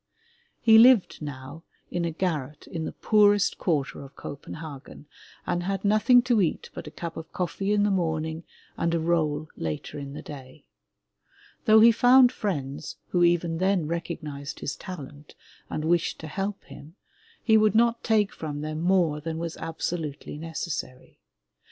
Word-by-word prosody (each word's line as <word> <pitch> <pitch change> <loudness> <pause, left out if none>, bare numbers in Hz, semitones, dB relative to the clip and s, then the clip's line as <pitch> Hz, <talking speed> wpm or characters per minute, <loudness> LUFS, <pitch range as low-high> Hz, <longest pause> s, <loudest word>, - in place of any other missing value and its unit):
He 225 -1 +7
lived 235 -8 +5
now 140 +1 -7 0.3
in 175 -1 -1
a - - 0
garret 155 -5 -3
in 160 -2 -5
the - - -4
poorest 205 -2 +3
quarter 145 -6 -1
of 135 - -13
Copenhagen 145 0 -9 0.4
and 175 - -1
had 195 +2 -3
nothing 215 +4 +5
to 240 -4 +2
eat 170 - -1
but - - -8
a - - -5
cup 165 +1 -7
of 160 0 -8
coffee 185 +3 -2
in 205 -1 +3
the 205 - +2
morning 160 -3 -1 0.3
and 170 0 0
a - - +1
roll 155 -2 0
later 80 - -5
in 140 -1 -7
the - - -8
day. 140 0 -11 1.0
Though 220 -1 +7
he 230 +1 +8
found 245 +2 +6
friends 145 - -4
who 175 -1 +2
even 170 -1 +2
then 185 -4 +1
recognized 155 -4 -5
his 140 - -3
talent 150 -6 -10 0.3
and 155 - -3
wished 170 +1 +1
to 160 - -7
help 195 +6 -4
him, 150 +4 -13 0.5
he 220 - +4
would 215 0 +4
not 235 +1 +3
take 215 -3 +2
from 145 -2 -5
them 155 +1 -4
more 170 -4 +2
than 160 +1 -4
was 165 0 -4
absolutely 160 -3 -4
necessary. 155 -4 -6
165 Hz, 160 wpm, -26 LUFS, 150-195 Hz, 1.0 s, he